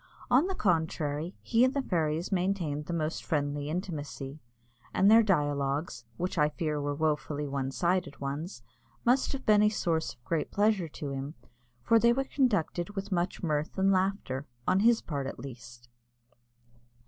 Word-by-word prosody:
On 265 +8 +5
the 385 - -2
contrary, 160 - 0
he 235 +1 +3
and 260 +2 +3
the 280 - +2
fairies 165 -3 -1
maintained 175 -6 -1
the - - -3
most 160 -1 -2
friendly 145 -1 -1
intimacy, 155 -5 -5 0.6
and 195 +2 +5
their 225 +1 +8
dialogues 145 - 0
which 180 -1 -2
I 150 0 +4
fear 150 -1 -2
were 145 0 -2
wofully 150 -1 -1
one 135 -1 -2
sided 175 +2 -1
ones 140 -1 -5 0.4
must 250 +2 +3
have 275 -1 -5
been 210 -1 +5
a 210 - +5
source 160 - -1
of 120 - -37
great 160 +3 -1
pleasure 205 -4 +2
to 145 -2 -6
him, 140 +3 -5 0.5
for 230 - +5
they 235 +1 +5
were 270 +2 0
conducted 205 - 0
with 195 +1 -4
much 175 0 -1
mirth 155 0 -1
and 195 +1 +3
laughter, 185 -8 0 0.2
on 190 - +4
his 230 +2 +4
part 140 -4 -3
at - - -6
least. 120 -2 -10
160 Hz, 165 wpm, -30 LUFS, 145-195 Hz, 0.6 s, their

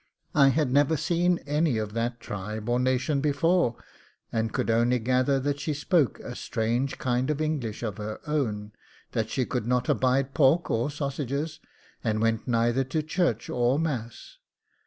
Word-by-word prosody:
I 140 -2 +6
had 140 -1 +2
never 145 +3 +3
seen 175 +3 +2
any 150 -3 +1
of 105 -1 -3
that 115 +1 -2
tribe 105 +1 -6
or 120 +1 +2
nation 130 +3 +1
before, 150 -2 +2 0.6
and 110 -1 -1
could - - 0
only 120 +2 +3
gather 130 +3 +2
that 145 +1 -1
she 150 +1 -2
spoke 150 -1 +1
a 125 - -7
strange 120 +4 -1
kind 125 +1 0
of 150 -1 0
English 145 -9 -2
of 105 -4 -3
her 105 +1 -5
own, 110 -9 -1 0.4
that 110 -1 -1
she 130 - 0
could 120 -3 -3
not 125 0 +1
abide 130 +1 +2
pork 155 +3 +3
or 115 +5 +1
sausages, 145 +2 -3 0.4
and 110 -2 0
went 115 +1 0
neither 120 +2 +2
to 150 +4 -1
church 155 - 0
or 125 +2 +1
mass. 145 - -4
130 Hz, 165 wpm, -27 LUFS, 115-150 Hz, 0.6 s, I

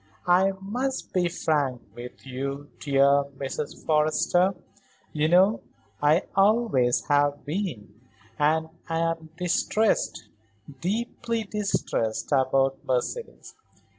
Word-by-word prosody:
I 185 +2 +4
must 250 +7 -3
be 180 -2 +2
frank 145 -7 0
with 120 +2 -10
you, 140 +2 -5
dear 140 0 +3
Mrs. 140 +2 -5
Forrester; 160 +4 +2 0.6
you 150 0 +1
know 185 +6 +4 0.4
I 150 +4 +4
always 195 - +3
have 145 0 +2
been, 145 - -4 0.4
and 160 +2 +2 0.2
I'm 165 0 -1
distressed, 190 +4 0 0.5
deeply 230 +4 -2
distressed 195 - -2
about 135 0 +2
Mercedes. 130 - -3
160 Hz, 95 wpm, -26 LUFS, 140-195 Hz, 0.6 s, I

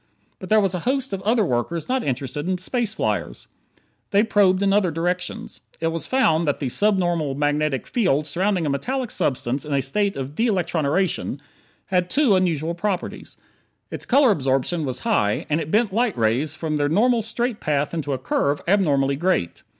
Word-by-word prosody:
But - - -9
there 215 0 +5
was 195 -3 +1
a 180 - -2
host 270 -3 -1
of 190 - -3
other 220 +1 +2
workers 150 +5 -2
not 260 0 0
interested 140 +4 -3
in 185 - 0
space 230 +4 -1
flyers; - - -2 0.6
they 205 0 +4
probed 200 -3 +3
in 195 0 +3
other 200 -3 +3
directions. 175 +3 -3 0.2
It 165 - 0
was 165 0 -4
found 170 -12 +2
that 145 - 0
the 135 - -2
subnormal 175 - +1
magnetic 145 -1 0
field 165 - +1
surrounding 180 +3 0
a - - 0
metallic 250 - -2
substance 130 0 -1
in 150 -2 -2
a 135 - +2
state 200 +8 -1
of 135 +1 -5
de 230 +10 +1
electroniration 175 - 0 0.6
had 180 -1 +2
two 275 -6 +3
unusual 170 -3 0
properties: 185 +2 -4 0.5
its - - -6
color 265 -1 +5
absorption 135 +1 0
was 130 -1 -4
high; 105 0 +1
and 155 +2 +2
it 155 - -5
bent 215 +1 +2
light 230 - +1
rays 120 +7 +1
from 160 -2 -2
their 145 0 +1
normal 230 +7 +3
straight 230 +1 -2
path 145 0 -1
into 150 -4 -3
a - - -1
curve 140 +2 0
abnormally 145 -8 +2
great. 165 - 0
170 Hz, 180 wpm, -22 LUFS, 145-205 Hz, 0.6 s, there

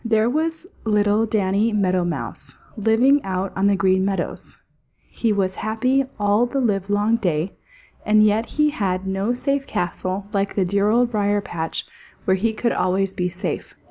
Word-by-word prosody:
There 225 0 +2
was 320 +3 -1 0.2
little 210 0 +2
Danny 210 +1 +1
Meadow 185 -4 +1
Mouse, 175 -1 -5 0.2
living 235 +6 +3
out 190 0 -3
on 195 +1 +2
the 200 - +3
Green 190 -1 +2
Meadows; 195 0 -3 0.5
he 230 - 0
was 190 -2 0
happy 255 +5 +1
all 205 +4 +3
the 275 +3 -2
livelong 205 -1 +1
day, 175 -4 -1 0.5
and 215 0 +4
yet 215 +2 +2
he 300 0 +4
had 190 -7 -2
no 195 +5 -1
safe 275 +2 -1
castle 185 +2 -3
like 200 0 -1
the 195 - +2
dear 200 +3 +1
Old 240 +2 +3
Briar 205 -2 +1
patch 165 -5 -4 0.4
where 190 - +3
he 220 +4 0
could 235 +2 -1
always 190 +1 0
be 180 -1 -1
safe. 185 +1 -5
205 Hz, 165 wpm, -22 LUFS, 190-230 Hz, 0.5 s, and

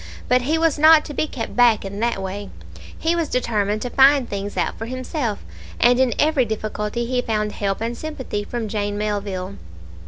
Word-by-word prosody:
But 250 0 +3
he 300 +6 0
was 320 -2 +1
not 310 0 +7
to 295 - -7
be 310 - -1
kept 230 -6 -6
back 235 -4 +4
in 200 +1 -6
that 235 -2 0
way; 200 +2 -5 0.5
he 330 +1 0
was 335 -3 -1
determined 215 -4 0
to 245 - -4
find 270 -1 +5
things 200 0 -5
out - - 0
for 225 - -6
himself, 255 -3 -3 0.3
and 245 +1 +4
in 260 -2 +2
every 300 -3 +3
difficulty 215 +1 -3
he 250 +1 0
found 215 -3 -1
help 200 0 -2
and 230 +1 -2
sympathy 260 -7 -5
from 230 +1 -4
Jane 205 -1 -2
Melville. 200 -2 -3
235 Hz, 190 wpm, -21 LUFS, 205-260 Hz, 0.5 s, not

